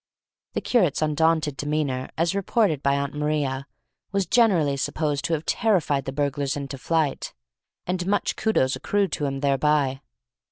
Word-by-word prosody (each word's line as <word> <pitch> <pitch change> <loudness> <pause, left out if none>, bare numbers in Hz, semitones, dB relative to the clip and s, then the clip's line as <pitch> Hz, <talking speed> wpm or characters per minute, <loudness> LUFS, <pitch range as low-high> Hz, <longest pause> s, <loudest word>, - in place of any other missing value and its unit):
The - - -1
curate's 180 - +2
undaunted 155 -1 +1
demeanour, 145 -3 -2
as 165 +2 +1
reported 200 - +1
by 140 0 +2
Aunt 140 0 -2
Maria, 145 -2 -1 0.4
was 195 -1 0
generally 190 - +3
supposed 145 +1 -1
to 170 - 0
have 155 0 -2
terrified 170 - +1
the 135 - -3
burglars 140 0 -1
into 140 -1 -6
flight, 160 0 -1 0.5
and 180 0 -2
much 205 0 0
kudos 135 -12 +1
accrued 200 -2 0
to 145 - -2
him 135 0 -4
thereby. 140 -1 +1
150 Hz, 150 wpm, -24 LUFS, 140-175 Hz, 0.5 s, generally